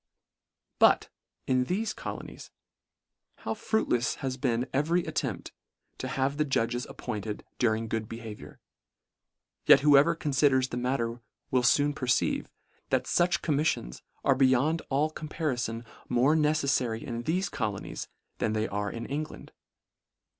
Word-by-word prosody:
But, - - +5 0.4
in 130 -1 +2
thefe 215 +5 -1
colonies, - - -7 0.9
how - - -2
fruitlefs 125 - 0
has 130 -1 -3
been 125 0 0
every 165 +6 +1
attempt - - -3 0.5
to 130 - -3
have 140 0 -1
the 150 - +3
judges 120 -3 -1
ap - - -12
pointed 105 -3 -5
during 115 -1 +1
good 110 -1 -3
behaviour; 115 -2 -9 1.1
yet - - +8
whoe 145 -1 +7
ver 170 +2 0
confiders 135 -4 +2
the - - -3
matter 120 -2 -1 0.3
will 130 - +3
foon 145 +3 +3
perceive, 125 -4 0 0.4
that - - +2
fuch 175 0 +2
commiSfions 145 - 0 0.2
are 135 - +6
beyond 135 +5 +3
all 145 +3 +1
com 155 -1 -7
parifon 120 -7 -2 0.2
more 125 +5 +4
neceSfary 140 -7 +1
in 120 -1 -4
thefe 180 +8 0
colonies, 105 -4 -4 0.3
than 110 - 0
they 110 0 0
are 100 0 -2
in 115 0 -6
England. 150 +2 -5
130 Hz, 135 wpm, -29 LUFS, 115-150 Hz, 1.1 s, yet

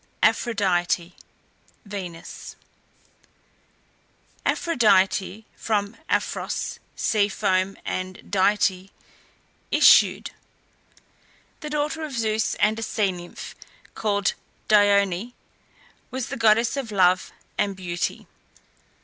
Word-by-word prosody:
APHRODITE 180 -6 +1 0.7
(VENUS). 185 -5 -8 1.9
Aphrodite 215 - +2
(from 205 -1 -1
aphros, - - -2 0.2
sea 205 -2 +2
foam, 190 0 0
and 185 0 -5
dite, 195 -1 +2 0.8
issued), - - +5 1.3
the 300 - -6
daughter 300 +2 -2
of 285 -5 -5
Zeus 220 -1 0
and 215 +1 +1
a - - -4
sea 210 -3 0
nymph 175 -1 -9 0.4
called 205 -3 0 0.3
Dione, 205 +1 +3 0.8
was 260 -2 -4
the 275 - -4
goddess 230 0 +3
of 265 -6 -4
Love 185 -2 +3 0.3
and 200 -1 0
Beauty. 180 -2 -3
205 Hz, 85 wpm, -24 LUFS, 185-225 Hz, 1.9 s, issued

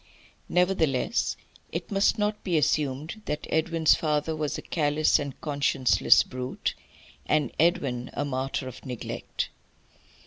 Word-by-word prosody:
Nevertheless 180 - +1 0.3
it - - -5
must 195 +3 +3
not 210 0 -1
be 175 -4 +1
assumed 150 +5 0
that 150 - -3
Edwin's 160 0 +3
father 155 0 0
was 150 -2 -2
a - - -7
callous 150 -1 +2
and 140 -2 -5
conscienceless 140 -8 +4
brute, 130 0 -4 0.5
and 150 -5 +2
Edwin 135 -7 +1
a - - -1
martyr 135 -1 -2
of 130 - -9
neglect. 125 -4 -4
150 Hz, 125 wpm, -27 LUFS, 135-165 Hz, 0.5 s, conscienceless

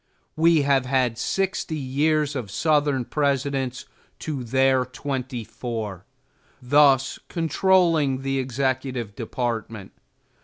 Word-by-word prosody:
We 160 -1 +4
have 135 -2 +2
had 125 -3 +1
sixty 190 -3 -1
years 145 +2 0
of 120 -7 -4
Southern 145 - +1
Presidents 135 -3 -1 0.3
to 145 -5 -4
their 130 +2 +2
twenty 125 -2 -5
four, 110 -5 -6 0.5
thus 135 0 +3
controlling 165 -5 +2
the 135 0 -1
executive 130 -3 -2
department. 115 -3 -4
135 Hz, 100 wpm, -24 LUFS, 125-145 Hz, 0.5 s, We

